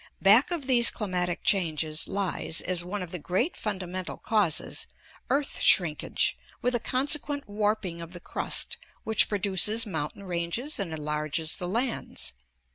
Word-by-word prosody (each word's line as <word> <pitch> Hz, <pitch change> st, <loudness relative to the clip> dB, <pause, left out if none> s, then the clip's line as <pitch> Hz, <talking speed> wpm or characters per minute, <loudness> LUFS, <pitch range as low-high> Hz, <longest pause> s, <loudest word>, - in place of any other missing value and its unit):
Back 215 Hz, +7 st, +6 dB
of 340 Hz, -6 st, -3 dB
these 245 Hz, -3 st, +5 dB
climatic 180 Hz, -5 st, -2 dB
changes 160 Hz, -5 st, +1 dB
lies, 190 Hz, -4 st, 0 dB
as 180 Hz, -2 st, 0 dB
one 185 Hz, +2 st, -4 dB
of 175 Hz, -, -9 dB
the 180 Hz, -, -4 dB
great 190 Hz, -, -1 dB
fundamental 185 Hz, -3 st, -4 dB
causes, 210 Hz, -7 st, +1 dB, 0.4 s
earth 280 Hz, 0 st, 0 dB
shrinkage, 160 Hz, -5 st, +3 dB, 0.2 s
with 250 Hz, -, 0 dB
a 240 Hz, -, +2 dB
consequent 285 Hz, +3 st, +1 dB
warping 205 Hz, -4 st, -1 dB
of 170 Hz, +1 st, -9 dB
the 175 Hz, -, -8 dB
crust -, -, -2 dB, 0.3 s
which 220 Hz, 0 st, +3 dB
produces 205 Hz, +3 st, +3 dB
mountain 160 Hz, -1 st, -4 dB
ranges 185 Hz, -, -3 dB
and 190 Hz, -5 st, -2 dB
enlarges 150 Hz, 0 st, -2 dB
the 180 Hz, -, -4 dB
lands. 235 Hz, +6 st, -2 dB
190 Hz, 140 wpm, -27 LUFS, 170-225 Hz, 0.4 s, Back